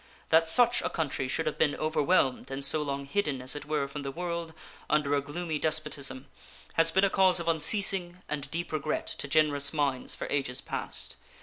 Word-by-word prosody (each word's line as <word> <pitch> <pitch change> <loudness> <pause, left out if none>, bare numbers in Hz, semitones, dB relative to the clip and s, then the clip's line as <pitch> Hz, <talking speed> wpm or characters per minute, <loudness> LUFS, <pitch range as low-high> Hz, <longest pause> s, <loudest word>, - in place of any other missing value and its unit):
That 165 0 +4
such 240 +6 +5
a - - -1
country 145 -4 -2
should 160 +5 -1
have 155 - -3
been 145 -2 +2
overwhelmed 155 -3 +1
and 135 +1 -3
so 150 +3 +1
long 140 -1 -3
hidden, 145 -3 -1
as 130 +2 +1
it 145 - -6
were, 150 -2 -1
from 145 +1 -7
the 135 - -4
world 170 +1 -4 0.4
under 150 -1 +2
a 140 - +2
gloomy 155 +2 -4
despotism 145 -4 -3 0.5
has 165 0 +4
been 190 +4 +2
a 200 - +4
cause 185 -2 +4
of 170 - -5
unceasing 180 +2 +3
and 145 -2 -4
deep 170 +1 -3
regret 155 -1 -2
to - - -5
generous 145 -1 +2
minds 140 -4 0
for - - -5
ages 135 -2 -1
past. - - -6
155 Hz, 195 wpm, -29 LUFS, 140-170 Hz, 0.5 s, such